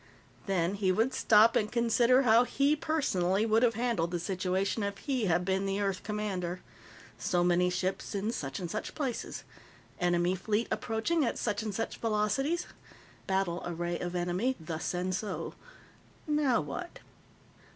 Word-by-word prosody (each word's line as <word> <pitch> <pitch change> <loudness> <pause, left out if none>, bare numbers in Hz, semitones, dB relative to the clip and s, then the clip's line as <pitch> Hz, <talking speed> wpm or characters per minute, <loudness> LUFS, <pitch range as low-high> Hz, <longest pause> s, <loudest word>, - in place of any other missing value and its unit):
Then 185 -2 +1
he 195 -2 +1
would 225 +7 +1
stop 220 +1 +5
and 210 - +1
consider 235 +2 +4
how 230 0 +6
he, 280 +4 +2
personally, 215 - +1
would 220 0 +3
have 235 -2 +3
handled 230 -8 0
the 175 0 -2
situation 190 +3 -1
if 200 -1 -2
he 260 -3 -1
had 175 -1 +2
been 190 +1 0
the 195 +1 -1
Earth 195 -2 -1
commander. 190 -4 -3 0.6
So 175 -1 +1
many 180 0 +3
ships 185 +3 -2
in 205 +3 -1
such 135 - -4
and 180 - -4
such 215 - -4
places. 265 -6 -3 0.6
Enemy 175 0 +2
fleet 210 +4 0
approaching 230 +9 0
at 235 - -1
such 210 -1 -1
and 215 -1 -3
such 215 +3 -3
velocities. 225 - 0 0.6
Battle 190 -3 0
array 175 0 -3
of 175 0 -4
enemy 180 +9 0
thus 160 0 -4
and 180 +1 -1
so. 205 +2 -3 0.7
Now 295 -5 +2
what? 145 -2 -6
200 Hz, 155 wpm, -30 LUFS, 180-230 Hz, 0.7 s, how